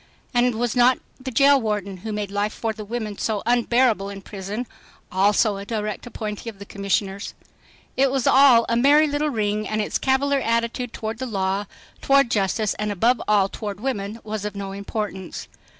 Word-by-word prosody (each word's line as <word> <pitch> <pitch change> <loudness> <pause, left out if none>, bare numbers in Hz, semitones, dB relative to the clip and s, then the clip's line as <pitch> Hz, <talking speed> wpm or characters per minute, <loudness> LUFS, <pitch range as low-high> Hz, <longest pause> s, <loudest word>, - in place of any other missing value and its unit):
And 245 -1 +3
was 240 +1 -1
not 250 +1 +5 0.2
the 260 0 -5
jail 275 +2 +5
warden 205 -3 -2
who 220 +5 -6
made 210 -1 -3
life 205 +1 -1
for 225 -1 -2
the 215 0 -8
women 215 -1 -5
so 215 -3 -1
unbearable 235 -3 +2
in 195 -1 -8
prison 205 +5 -5 0.5
also 200 +2 +3
a 200 - -6
direct 215 0 -3
appointee 215 -1 -5
of 215 - -11
the 200 - -9
commissioners? 200 0 -2 0.6
It 270 +1 +3
was 265 -2 -1
all 260 -4 +6
a 230 - +1
merry 285 +6 +5
little 295 0 0
ring 215 -4 -1
and 215 - -1
its 210 - -1
cavalier 275 +1 +2
attitude 230 +1 -1
toward 220 +1 -5
the 260 - -3
law, 195 -2 -1 0.3
toward 275 -3 +4
justice, 205 +1 +1
and 210 0 -1
above 230 +5 +2
all 205 -2 +4
toward 205 -1 -6
women 215 -3 -3
was 215 -1 -4
of 210 -1 -4
no 200 -1 -5
importance. 200 -2 -5
215 Hz, 180 wpm, -23 LUFS, 200-245 Hz, 0.6 s, all